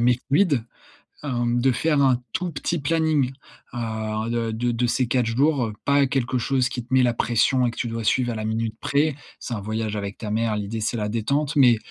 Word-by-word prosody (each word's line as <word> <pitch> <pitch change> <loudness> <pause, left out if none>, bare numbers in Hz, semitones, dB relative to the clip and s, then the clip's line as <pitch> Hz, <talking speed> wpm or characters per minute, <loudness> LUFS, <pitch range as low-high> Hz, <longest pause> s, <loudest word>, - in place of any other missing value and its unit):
mais 120 +1 +3
fluide, 145 - +3 0.6
hem, 120 -3 0
de 130 - +4
faire 145 +4 +1
un 130 -3 +3
tout 180 -1 -2
petit 165 +3 -2
planning, 155 -3 +1 0.4
heu, 110 -1 -3
de 115 -1 -1
de 120 +2 -1
de 120 +1 0
ces 125 +1 +1
4 125 0 +1
jours, 130 +1 +2
heu, 105 - -6
pas 140 -1 +4
quelque 130 -1 0
chose 130 +1 +1
qui 125 - -5
te - - -32
mets 130 - +5
la 120 -1 +2
pression 120 +2 +2
et - - -1
que - - -14
tu 120 - -2
dois 115 0 -4
suivre 120 0 +2
à - - -4
la 110 - -4
minute 110 0 -2
près. 145 +1 +1 0.2
C'est 120 - -5
un 100 - -5
voyage 110 +1 -3
avec 100 -1 -4
ta 105 -2 -5
mère, 110 0 0
l'idée 105 +2 -4
c'est 120 - -1
la 105 -1 -2
détente. 140 +8 -1
Mais, 125 -5 +6
120 Hz, 225 wpm, -23 LUFS, 115-135 Hz, 0.6 s, Mais